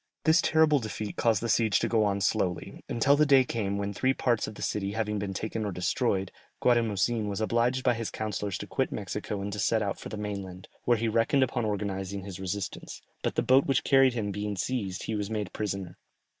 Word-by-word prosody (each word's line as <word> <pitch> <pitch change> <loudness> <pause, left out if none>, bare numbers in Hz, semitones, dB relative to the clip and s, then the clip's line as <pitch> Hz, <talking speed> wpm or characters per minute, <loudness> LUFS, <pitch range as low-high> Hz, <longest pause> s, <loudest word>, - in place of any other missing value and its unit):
This 160 +1 +5
terrible 160 -2 +4
defeat 110 -2 -5
caused 115 -2 +2
the - - 0
siege 110 -2 +3
to - - 0
go 110 -2 +2
on 100 -1 0
slowly, 95 -3 -1
until 135 +5 +3
the 150 - +4
day 135 -2 +6
came 105 -5 -2
when 100 0 -2
three 130 +5 +1
parts 120 -3 +1
of 110 - -8
the - - -7
city 100 -1 -2
having 105 -1 -1
been 100 -1 -3
taken 110 +3 -3
or 105 - -2
destroyed, 95 +2 0 0.3
Guatimozin 115 -2 +2
was 100 - -3
obliged 120 +4 +1
by 125 - +4
his 115 -1 -3
councillors 105 -2 -3
to - - -6
quit - - -1
Mexico 100 -2 -4
and 100 0 -4
to 105 - -4
set 110 +3 +2
out 100 -2 -3
for - - -8
the 110 - -6
mainland, 100 -3 -6 0.2
where 120 -1 +4
he 115 +1 -1
reckoned 115 +6 +3
upon 120 -2 -1
organizing 100 -2 -3
his 95 -1 -7
resistance, 95 0 -5 0.2
but - - -2
the - - +1
boat 130 +2 +4
which 135 -2 +2
carried 135 -2 +5
him 105 -3 -2
being 105 +1 -3
seized 100 -3 -2
he 110 - -3
was 105 -1 -2
made 105 -3 -3
prisoner. 95 -4 -4
105 Hz, 220 wpm, -28 LUFS, 100-120 Hz, 0.3 s, day